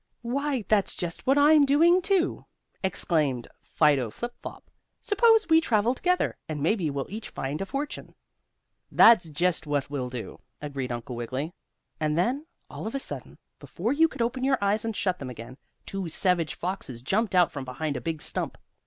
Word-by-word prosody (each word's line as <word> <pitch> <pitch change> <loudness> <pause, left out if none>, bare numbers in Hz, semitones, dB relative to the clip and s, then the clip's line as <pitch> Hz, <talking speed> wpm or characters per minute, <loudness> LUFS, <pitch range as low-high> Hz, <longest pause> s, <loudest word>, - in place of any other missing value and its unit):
"Why, 265 -1 -1
that's 210 -3 +2
just 175 +5 -5
what 270 +2 +4
I'm 295 +1 +6
doing, 330 +6 +5
too," 375 -1 0 0.4
exclaimed 155 -9 0
Fido 145 -6 +2
Flip 240 - -6
Flop. - - -10 0.3
"Suppose 445 +1 +4
we 320 0 +5
travel 230 -4 +2
together? 360 +7 0
and 155 -1 -3
maybe 175 -2 +1
we'll 140 -1 -3
each 215 +2 -7
find 140 +6 -4
a 195 - -3
fortune." 285 +7 -5 0.8
"That's 220 -8 +6
just 160 +1 0
what 145 -1 -1
we'll 130 -3 -3
do," 125 -2 -7 0.2
agreed 140 -4 -4
Uncle 120 +1 -5
Wiggily. 130 +7 -4 0.5
And 155 0 0
then, 260 - 0 0.2
all - - -7
of 225 - -5
a - - 0
sudden, - - -6 0.2
before 220 +9 -2
you 325 +3 +5
could 240 - -3
open 255 +2 -2
your 270 0 +3
eyes 200 +1 +1
and 225 -1 -3
shut 185 -3 -1
them 130 - -6
again, 120 +1 -9 0.3
two 195 -3 -4
savage 170 -2 +1
foxes 165 -10 -5
jumped 200 - 0
out 180 -2 +5
from 140 - -5
behind 140 +4 -4
a - - -4
big 160 -2 -3
stump. - - -2
185 Hz, 180 wpm, -27 LUFS, -, 0.8 s, I'm